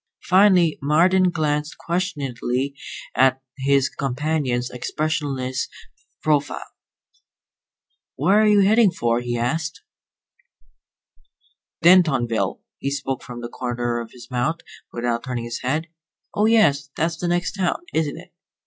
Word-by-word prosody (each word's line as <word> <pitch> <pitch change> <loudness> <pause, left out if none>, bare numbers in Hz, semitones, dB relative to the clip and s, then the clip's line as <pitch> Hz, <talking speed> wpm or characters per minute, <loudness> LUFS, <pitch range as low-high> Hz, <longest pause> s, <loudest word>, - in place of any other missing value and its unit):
Finally 185 -3 +4
Marden 180 +6 +4
glanced 150 -2 -1
questioningly 140 -7 -2 0.4
at 130 0 +3 0.2
his 135 0 +3
companion's 135 -2 -2
expressionless 135 -1 -2 0.6
profile. 145 -2 0 1.5
"Where 190 +10 +3
are 215 - +4
you 205 -1 +5
headed 210 0 +4
for?" 115 0 +1
he 120 0 -3
asked. 155 +7 -2 2.0
"Dentonville." 155 -11 +3 0.2
He 140 - -2
spoke 135 -2 -3
from 120 -1 -8
the 120 - -4
corner 120 -1 -2
of 115 -1 -7
his 120 -1 -13
mouth, 130 +7 -1 0.3
without 120 0 -2
turning 125 -2 -4
his 115 0 -5
head. 145 +6 -1 0.5
"Oh, 210 +1 +2
yes. 145 -12 +3
That's 165 +1 0
the 175 - -3
next 175 0 0
town, 190 - -1
isn't 155 -3 0
it?" - - -13
145 Hz, 120 wpm, -22 LUFS, 125-170 Hz, 2.0 s, you